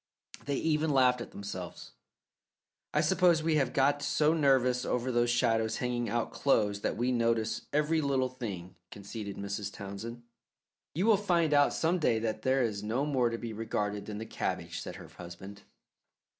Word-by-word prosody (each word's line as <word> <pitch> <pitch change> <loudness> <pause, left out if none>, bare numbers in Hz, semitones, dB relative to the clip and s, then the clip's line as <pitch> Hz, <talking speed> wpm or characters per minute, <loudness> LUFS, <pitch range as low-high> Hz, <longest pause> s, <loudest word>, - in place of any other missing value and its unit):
They 140 - -1
even 155 +1 +1
laughed 130 -3 +4
at - - -7
themselves. 95 -3 -7 1.0
"I 150 - +2
suppose 170 0 +3
we 160 -1 +2
have 135 -4 +1
got 145 +1 +2
so 150 +2 +2
nervous 130 -5 +3
over 125 +1 -1
those 120 0 +2
shadows 115 -2 +1
hanging 120 -2 -1
out 120 +1 -1
clothes 105 -7 +1
that - - -1
we 125 +2 +1
notice 115 -2 0
every 150 +2 +2
little 135 -3 +1
thing," 100 -9 -6 0.2
conceded 100 0 -7
Mrs. 100 +1 -4
Townsend. 105 +5 -7 0.7
"You 180 +5 +1
will 220 -2 +6
find 170 -6 +2
out 145 0 +5
some 170 +3 +1
day 120 -8 +2
that 110 -1 -2
that 130 0 +2
is 105 -4 -2
no 115 +7 -1
more 130 -5 +2
to 115 - -3
be 115 -1 -6
regarded 105 -2 -3
than 105 -1 -5
the 110 - -5
cabbage," - - -3
said - - -7
her - - -10
husband. 95 +3 -10
120 Hz, 170 wpm, -30 LUFS, 110-145 Hz, 1.0 s, will